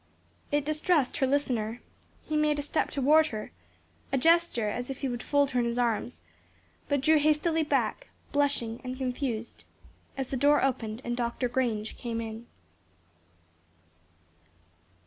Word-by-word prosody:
It 290 Hz, -1 st, +1 dB
distressed 305 Hz, -2 st, +1 dB
her 265 Hz, -, +2 dB
listener. 245 Hz, -5 st, 0 dB, 0.4 s
He 310 Hz, -, -3 dB
made 300 Hz, -1 st, +2 dB
a 290 Hz, -, -2 dB
step 295 Hz, -, 0 dB
toward 305 Hz, +3 st, +4 dB
her, 215 Hz, -6 st, -6 dB, 0.6 s
a 270 Hz, -, +2 dB
gesture 330 Hz, -6 st, +3 dB
as 245 Hz, +5 st, -3 dB
if 270 Hz, -, -4 dB
he 275 Hz, -, -2 dB
would 240 Hz, -1 st, -3 dB
fold 285 Hz, -1 st, +2 dB
her 250 Hz, -, +1 dB
in 240 Hz, -, +1 dB
his 235 Hz, +1 st, -2 dB
arms, 225 Hz, -, -1 dB, 0.7 s
but 285 Hz, -2 st, +2 dB
drew 310 Hz, +3 st, +5 dB
hastily 310 Hz, +2 st, +2 dB
back, 315 Hz, +10 st, 0 dB, 0.2 s
blushing 280 Hz, -6 st, 0 dB
and 255 Hz, 0 st, -5 dB
confused 250 Hz, -3 st, -3 dB, 0.5 s
as 270 Hz, -2 st, -3 dB
the 270 Hz, -, -2 dB
door 290 Hz, +3 st, +4 dB
opened 240 Hz, -3 st, -1 dB
and 240 Hz, 0 st, -1 dB
Dr. 240 Hz, +1 st, -1 dB
Grange 235 Hz, -4 st, -1 dB
came 230 Hz, -2 st, -3 dB
in. 225 Hz, +1 st, -6 dB
260 Hz, 145 wpm, -29 LUFS, 235-295 Hz, 0.7 s, drew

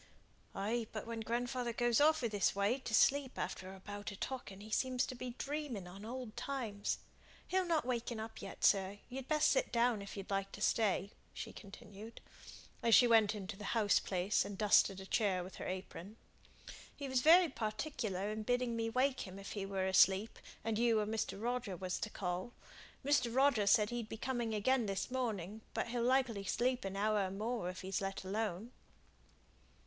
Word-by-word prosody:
"Ay, 220 Hz, +3 st, -1 dB
but 215 Hz, -, -5 dB
when 230 Hz, 0 st, -4 dB
grandfather 240 Hz, +2 st, -2 dB
goes 240 Hz, +1 st, +2 dB
off 310 Hz, -2 st, +4 dB
i' -, -, +3 dB
this 205 Hz, -3 st, +1 dB
way 200 Hz, +6 st, +1 dB
to 255 Hz, -, -6 dB
sleep 265 Hz, +4 st, +3 dB
after 185 Hz, 0 st, -4 dB
a 190 Hz, -, -11 dB
bout 205 Hz, +1 st, -6 dB
of 200 Hz, -, -10 dB
talking 245 Hz, -7 st, -5 dB
he 215 Hz, +2 st, -11 dB
seems 255 Hz, +3 st, +1 dB
to -, -, -6 dB
be 245 Hz, -1 st, -6 dB
dreaming 280 Hz, -9 st, -4 dB
on 195 Hz, +3 st, -10 dB
old 240 Hz, 0 st, -6 dB
times. 240 Hz, -5 st, -2 dB, 0.5 s
He'll 375 Hz, -1 st, +1 dB
not 325 Hz, -5 st, +1 dB
waken 240 Hz, -2 st, -2 dB
up 220 Hz, 0 st, -7 dB
yet, -, -, -8 dB
sir; 195 Hz, 0 st, +3 dB
you'd 260 Hz, 0 st, -6 dB
best 305 Hz, -1 st, +3 dB
sit -, -, +1 dB
down 235 Hz, -2 st, +2 dB
if 200 Hz, +1 st, -8 dB
you'd 195 Hz, 0 st, -7 dB
like 195 Hz, 0 st, -1 dB
to -, -, -8 dB
stay," 205 Hz, -2 st, +1 dB, 0.2 s
she -, -, -6 dB
continued, 205 Hz, +2 st, -11 dB, 0.6 s
as 230 Hz, -1 st, +6 dB
she 245 Hz, -, +8 dB
went 220 Hz, -3 st, +5 dB
into 200 Hz, 0 st, -6 dB
the 210 Hz, -, -10 dB
house 210 Hz, -2 st, +4 dB
place 190 Hz, +2 st, +1 dB
and 200 Hz, -1 st, -6 dB
dusted 200 Hz, -2 st, +4 dB
a 190 Hz, -, -8 dB
chair 195 Hz, -3 st, +1 dB
with 185 Hz, -, -10 dB
her -, -, -5 dB
apron. 190 Hz, +2 st, -6 dB, 0.8 s
"He 280 Hz, -, -5 dB
was 260 Hz, -1 st, +1 dB
very 340 Hz, +4 st, +7 dB
particular 215 Hz, -, -3 dB
in 215 Hz, 0 st, -3 dB
bidding 245 Hz, +1 st, 0 dB
me 225 Hz, 0 st, -1 dB
wake 255 Hz, 0 st, +1 dB
him 185 Hz, +1 st, -9 dB
if 195 Hz, 0 st, -8 dB
he 195 Hz, -2 st, -4 dB
were 195 Hz, -1 st, -1 dB
asleep, 190 Hz, +2 st, +4 dB, 0.2 s
and 225 Hz, -1 st, -1 dB
you 230 Hz, -2 st, +4 dB
or 210 Hz, -, 0 dB
Mr. 215 Hz, -2 st, -2 dB
Roger 235 Hz, -4 st, -2 dB
was 185 Hz, +1 st, -3 dB
to 220 Hz, -, -3 dB
call. 185 Hz, +4 st, -3 dB, 0.5 s
Mr. 280 Hz, -4 st, +3 dB
Roger 250 Hz, -5 st, +3 dB
said 210 Hz, +1 st, +5 dB
he'd 235 Hz, -2 st, -4 dB
be 225 Hz, -, -5 dB
coming 240 Hz, -2 st, -2 dB
again 240 Hz, +2 st, +2 dB
this 195 Hz, +5 st, -2 dB
morning 220 Hz, -5 st, -2 dB
but -, -, -1 dB
he'll 240 Hz, 0 st, -1 dB
likely 250 Hz, -4 st, +2 dB
sleep 245 Hz, +4 st, 0 dB
an 195 Hz, 0 st, -4 dB
hour 210 Hz, +1 st, +2 dB
or -, -, -5 dB
more, 210 Hz, 0 st, -2 dB
if 185 Hz, -, -7 dB
he's 190 Hz, +1 st, -2 dB
let 195 Hz, 0 st, -3 dB
alone." 210 Hz, +2 st, -3 dB
220 Hz, 195 wpm, -36 LUFS, 200-245 Hz, 0.8 s, she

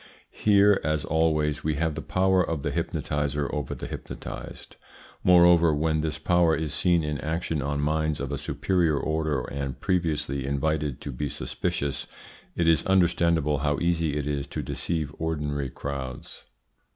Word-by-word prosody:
Here, 100 Hz, -1 st, +4 dB
as 75 Hz, -1 st, 0 dB
always, 75 Hz, -2 st, +1 dB
we 80 Hz, -1 st, 0 dB
have 80 Hz, +1 st, 0 dB
the -, -, -5 dB
power 95 Hz, 0 st, +2 dB
of 80 Hz, -4 st, -3 dB
the -, -, -1 dB
hypnotiser 75 Hz, 0 st, -1 dB
over 75 Hz, -3 st, -3 dB
the -, -, -7 dB
hypnotised. -, -, -8 dB, 0.5 s
Moreover, 85 Hz, -3 st, +6 dB
when 80 Hz, +1 st, +1 dB
this 75 Hz, -1 st, -2 dB
power 85 Hz, 0 st, +3 dB
is 80 Hz, -3 st, -3 dB
seen 85 Hz, -2 st, +2 dB
in 75 Hz, -1 st, -2 dB
action 80 Hz, -1 st, -2 dB
on 70 Hz, +1 st, -1 dB
minds 80 Hz, 0 st, 0 dB
of 70 Hz, 0 st, -4 dB
a 70 Hz, -, -2 dB
superior 85 Hz, -6 st, +1 dB
order 80 Hz, -2 st, 0 dB
and 70 Hz, -1 st, -5 dB
previously 75 Hz, -7 st, -1 dB
invited 70 Hz, 0 st, -1 dB
to 70 Hz, -, -5 dB
be 70 Hz, +3 st, -3 dB
suspicious, 70 Hz, +2 st, -3 dB, 0.5 s
it 85 Hz, -, +1 dB
is 80 Hz, -1 st, +4 dB
understandable 85 Hz, -5 st, +2 dB
how 75 Hz, 0 st, 0 dB
easy 85 Hz, -3 st, 0 dB
it 75 Hz, -, -2 dB
is 70 Hz, -1 st, -2 dB
to -, -, -4 dB
deceive 80 Hz, -4 st, -3 dB
ordinary 75 Hz, -4 st, -2 dB
crowds. 65 Hz, -1 st, -6 dB
75 Hz, 155 wpm, -26 LUFS, 70-80 Hz, 0.5 s, Moreover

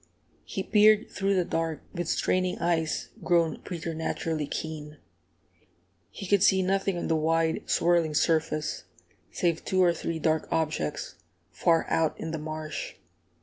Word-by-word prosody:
He -, -, -4 dB
peered 215 Hz, 0 st, +4 dB
through 195 Hz, 0 st, 0 dB
the 180 Hz, -2 st, +2 dB
dark, 165 Hz, -2 st, -2 dB
with 175 Hz, -2 st, -3 dB
straining 185 Hz, +2 st, 0 dB
eyes 165 Hz, -2 st, -1 dB
grown 170 Hz, -3 st, +2 dB
preternaturally 160 Hz, -2 st, -3 dB
keen. 150 Hz, -1 st, -5 dB, 1.1 s
He -, -, -8 dB
could 200 Hz, 0 st, +3 dB
see 190 Hz, -1 st, +4 dB
nothing 195 Hz, 0 st, 0 dB
on -, -, -3 dB
the 165 Hz, -, +2 dB
wide, 160 Hz, +1 st, 0 dB
swirling 170 Hz, -2 st, +2 dB
surface 155 Hz, -1 st, 0 dB, 0.5 s
save 170 Hz, -2 st, 0 dB
two 185 Hz, -1 st, +2 dB
or 175 Hz, -1 st, +4 dB
three 165 Hz, 0 st, -3 dB
dark 160 Hz, 0 st, 0 dB
objects, 155 Hz, -, -2 dB, 0.3 s
far 165 Hz, -1 st, +2 dB
out 160 Hz, -2 st, 0 dB
in 160 Hz, -, -4 dB
the 160 Hz, -, -3 dB
marsh. 155 Hz, 0 st, -5 dB
165 Hz, 140 wpm, -27 LUFS, 155-180 Hz, 1.1 s, peered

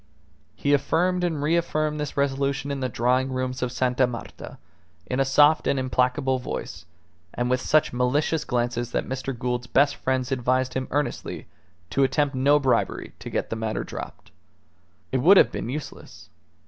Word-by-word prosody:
He 145 Hz, -, +1 dB
affirmed 180 Hz, +6 st, +1 dB
and 160 Hz, -5 st, -1 dB
reaffirmed 155 Hz, -1 st, 0 dB
this 150 Hz, -1 st, -4 dB
resolution 140 Hz, 0 st, 0 dB
in 140 Hz, -, -3 dB
the 130 Hz, -1 st, -2 dB
drawing 125 Hz, +3 st, +1 dB
rooms 130 Hz, 0 st, -3 dB
of 125 Hz, -1 st, -1 dB
Sta. 125 Hz, 0 st, +1 dB
Marta, 120 Hz, -1 st, -8 dB, 0.5 s
in 125 Hz, -, -2 dB
a -, -, +5 dB
soft 145 Hz, +3 st, +4 dB
and 140 Hz, -, +2 dB
implacable 130 Hz, +1 st, +1 dB
voice, 90 Hz, -8 st, -6 dB, 0.5 s
and 120 Hz, +1 st, -1 dB
with 125 Hz, 0 st, +1 dB
such 155 Hz, -2 st, +2 dB
malicious 145 Hz, +5 st, +1 dB
glances 120 Hz, -1 st, -2 dB
that -, -, -1 dB
Mr. 130 Hz, -1 st, -4 dB
Gould's 125 Hz, 0 st, -2 dB
best 140 Hz, +3 st, +3 dB
friends 130 Hz, 0 st, -1 dB
advised 130 Hz, 0 st, 0 dB
him 130 Hz, 0 st, -2 dB
earnestly 145 Hz, +1 st, -3 dB, 0.5 s
to 140 Hz, -, +2 dB
attempt 145 Hz, +1 st, +1 dB
no 140 Hz, +3 st, +4 dB
bribery 135 Hz, -3 st, 0 dB
to -, -, -7 dB
get -, -, -3 dB
the -, -, -1 dB
matter 110 Hz, -1 st, -2 dB
dropped. -, -, -9 dB, 0.8 s
It 130 Hz, -, +1 dB
would 185 Hz, +10 st, +7 dB
have -, -, +6 dB
been -, -, -4 dB
useless. 150 Hz, +2 st, -8 dB
130 Hz, 165 wpm, -25 LUFS, 125-145 Hz, 0.8 s, would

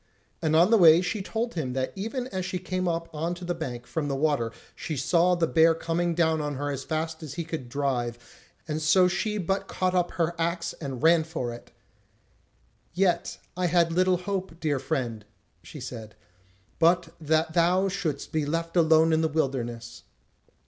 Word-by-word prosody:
And 155 Hz, -1 st, +1 dB
on 175 Hz, +6 st, +5 dB
the 225 Hz, -, +6 dB
way 165 Hz, -2 st, +8 dB
she 205 Hz, +3 st, -2 dB
told 225 Hz, +4 st, -3 dB
him 135 Hz, -7 st, -3 dB
that 130 Hz, 0 st, -2 dB
even 225 Hz, +6 st, -3 dB
as 190 Hz, -4 st, -3 dB
she 180 Hz, 0 st, -3 dB
came 185 Hz, 0 st, -2 dB
up 165 Hz, -1 st, -1 dB
on 165 Hz, +3 st, -2 dB
to 175 Hz, 0 st, -8 dB
the 175 Hz, -, -1 dB
bank 125 Hz, -8 st, -6 dB
from 155 Hz, -3 st, -3 dB
the 140 Hz, -, -1 dB
water 135 Hz, -5 st, +1 dB, 0.2 s
she 155 Hz, -, -5 dB
saw 170 Hz, +7 st, +3 dB
the 170 Hz, -1 st, +2 dB
bear 165 Hz, 0 st, +4 dB
coming 170 Hz, +1 st, -1 dB
down 160 Hz, -2 st, +2 dB
on 145 Hz, -1 st, -3 dB
her 145 Hz, +2 st, -2 dB
as 135 Hz, -1 st, -4 dB
fast 160 Hz, +1 st, -3 dB
as 150 Hz, -3 st, -7 dB
he 170 Hz, -, -3 dB
could 155 Hz, -6 st, -6 dB
drive, 120 Hz, -3 st, -1 dB, 0.5 s
and 155 Hz, 0 st, -2 dB
so 180 Hz, +4 st, +5 dB
she 210 Hz, +4 st, -1 dB
but 195 Hz, +1 st, -1 dB
caught 185 Hz, -1 st, -1 dB
up 180 Hz, -1 st, +2 dB
her 170 Hz, 0 st, 0 dB
axe, 170 Hz, +1 st, -1 dB
and 135 Hz, -3 st, -5 dB
ran 165 Hz, 0 st, +5 dB
for 155 Hz, -7 st, -4 dB
it: 120 Hz, -, -12 dB, 1.3 s
"Yet 180 Hz, -1 st, +1 dB, 0.2 s
I 180 Hz, 0 st, 0 dB
had 170 Hz, -1 st, +2 dB
little 185 Hz, +1 st, +3 dB
hope, 185 Hz, -2 st, -4 dB
dear 150 Hz, -4 st, 0 dB
friend," 130 Hz, -6 st, -3 dB, 0.4 s
she 90 Hz, -, -10 dB
said, 115 Hz, -4 st, -8 dB, 0.6 s
"but 170 Hz, 0 st, +3 dB
that 160 Hz, +1 st, +1 dB
thou 180 Hz, +3 st, +3 dB
shouldst 165 Hz, -7 st, -3 dB
be 155 Hz, -1 st, 0 dB
left 165 Hz, +3 st, -2 dB
alone 160 Hz, -1 st, +5 dB
in 160 Hz, -, +3 dB
the 160 Hz, -, +2 dB
wilderness." 120 Hz, -6 st, -3 dB
165 Hz, 190 wpm, -27 LUFS, 145-175 Hz, 1.3 s, way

